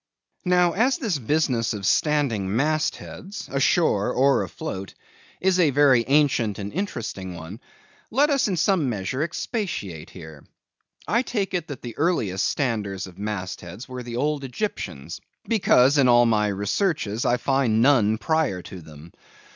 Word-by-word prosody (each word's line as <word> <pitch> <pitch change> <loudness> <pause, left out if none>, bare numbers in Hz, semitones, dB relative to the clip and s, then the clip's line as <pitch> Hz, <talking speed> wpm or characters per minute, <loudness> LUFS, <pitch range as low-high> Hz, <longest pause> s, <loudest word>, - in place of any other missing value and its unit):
Now, 180 -1 +3
as 250 - +2
the 215 - -1
business 125 -4 0
of 100 -2 -5
standing 115 -5 +1
mast 155 +5 +1
heads, 195 +1 -9
ashore 135 - +2
or 135 +2 +3
afloat, 100 - -6 0.4
is 185 0 +2
a 165 -4 +5
very 135 -3 +4
ancient 135 -7 +2
and 100 0 -6
interesting 115 - -4
one, 85 +6 -9 0.5
let 285 +6 +3
us 275 -4 +2
in 190 -3 -1
some 165 -4 +2
measure 115 +5 -3
expatiate 160 - -4
here. 80 -5 -12 0.6
I 235 - +2
take 210 -7 -3
it, 175 -3 -2
that 145 -5 -8
the 120 -2 -7
earliest 115 - +1
standers 105 -8 -2
of 95 -1 -13
mast 100 -3 -4
heads 90 +8 -9
were 130 -1 -6
the 120 -1 -7
old 145 +2 -1
Egyptians; 125 - -5 0.3
because, 180 - +4
in 135 - +5
all 120 0 +6
my 105 -2 +2
researches, 105 - -1
I 120 - +2
find 135 -4 +1
none 115 -6 +4
prior 155 - 0
to 95 - -9
them. 80 +1 -14
130 Hz, 155 wpm, -24 LUFS, 100-160 Hz, 0.6 s, all